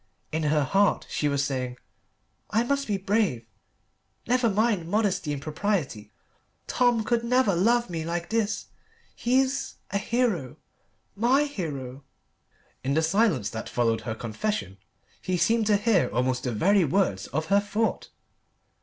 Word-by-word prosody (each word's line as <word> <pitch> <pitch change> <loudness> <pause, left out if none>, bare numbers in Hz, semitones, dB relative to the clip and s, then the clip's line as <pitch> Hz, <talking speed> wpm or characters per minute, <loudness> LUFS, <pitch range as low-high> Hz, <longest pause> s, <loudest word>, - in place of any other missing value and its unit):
In 160 - -1
her 150 -1 +2
heart 195 +8 +2
she 150 - 0
was 140 0 +1
saying, 125 -3 -3 0.7
"I 220 +3 +2
must 280 +3 -1
be 205 -2 0
brave. 195 - 0 0.8
Never 245 0 +2
mind 210 -4 +1
modesty 200 -6 0
and 145 - -3
propriety. 150 - -2 0.5
Tom 240 -3 +2
could 235 +1 0
never 250 -3 +3
love 235 +7 +2
me 165 -3 -4
like 170 +3 -4
this. 220 -2 -1 0.5
He's 265 +2 0 0.2
a 200 - 0
hero 220 - -1 0.6
my 245 +7 +3
hero." 145 - -5 0.8
In 135 +2 0
the 160 - +2
silence 190 - +2
that 110 0 -6
followed 115 -2 +1
her 110 -3 -4
confession 110 - -3 0.4
he 185 0 -1
seemed 225 +3 +2
to 210 -2 +4
hear 205 -3 +2
almost 125 +1 0
the 125 - 0
very 190 - +3
words 145 - 0
of 155 +5 -2
her 200 - +6
thought. 210 +2 -2
195 Hz, 145 wpm, -26 LUFS, 140-225 Hz, 0.8 s, her